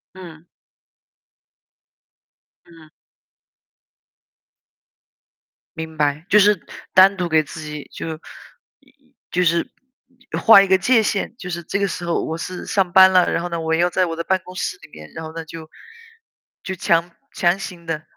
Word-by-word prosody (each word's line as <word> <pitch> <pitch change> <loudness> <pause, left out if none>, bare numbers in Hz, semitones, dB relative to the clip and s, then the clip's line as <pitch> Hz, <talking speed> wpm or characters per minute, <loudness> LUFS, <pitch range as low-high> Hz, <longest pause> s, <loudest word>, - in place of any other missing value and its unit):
嗯。 170 -3 -12 2.2
嗯。 165 -2 -18 2.9
明 160 -1 -7
白， 150 +1 0
就 210 - +6
是 205 -1 +4 0.3
单 190 +2 +6
独 180 -2 -3
给 155 -1 +3
自 155 +1 -10
己， 150 -1 -8
就 160 -1 -5 0.6
一 280 - -28
一 270 0 -33 0.2
就 180 - +1
是 170 -1 0 0.7
画 225 -3 +8
一 195 - +1
个 190 0 +4
界 225 +5 +3
线， 210 0 -2
就 180 -8 -8
是 170 -1 -5
这 200 - -3
个 200 - +1
时 180 -1 -5
候 170 - -1
我 160 - -4
是 180 +2 -7
上 190 -3 0
班 190 0 +7
了， 180 -1 +3
然 - - -1
后 175 - -4
呢， 170 -1 -3
我 160 0 -1
要 175 +2 +2
在 185 +1 +1
我 165 -2 -4
的 170 - -4
办 190 +2 0
公 185 - -12
室 180 - -3
里 - - -15
面， 75 0 -13
然 160 - -7
后 160 - -9
呢 165 0 -7
就 160 0 -10 0.9
就 190 - -5
强 170 -1 +1 0.2
强 175 +2 +1
行 180 -3 -9
地 160 -2 -4
175 Hz, 180 characters per minute, -20 LUFS, 160-190 Hz, 2.9 s, 画